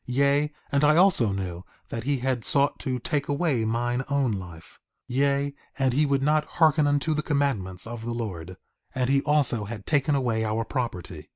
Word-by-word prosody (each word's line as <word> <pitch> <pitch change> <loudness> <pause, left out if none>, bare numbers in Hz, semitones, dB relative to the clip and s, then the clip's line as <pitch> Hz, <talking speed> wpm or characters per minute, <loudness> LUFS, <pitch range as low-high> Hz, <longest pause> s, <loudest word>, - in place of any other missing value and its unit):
Yea, 140 +3 +2 0.2
and 140 +1 +2
I 150 +1 +5
also 175 - +4
knew 90 -2 -4 0.3
that 115 0 -5
he 140 0 +1
had 125 -2 -1
sought 140 0 +3
to 130 -1 -2
take 140 +3 -2
away 145 -5 0
mine 120 +3 -1
own 140 -4 +1
life; 90 -5 -8 0.3
yea, 140 +2 +1 0.2
and 135 -2 +1
he 150 +3 +2
would 140 -1 +1
not 150 +1 +3
hearken 155 -2 +4
unto 145 +2 +1
the 150 - -1
commandments 115 - -1
of 115 0 -7
the 120 - -4
Lord; 95 -7 -5 0.4
and 130 0 0
he 140 0 +3
also 140 -8 +1
had 105 -1 -8
taken 145 -1 +1
away 120 -5 0
our 110 +1 -1
property. 90 - -5
130 Hz, 185 wpm, -26 LUFS, 110-145 Hz, 0.4 s, I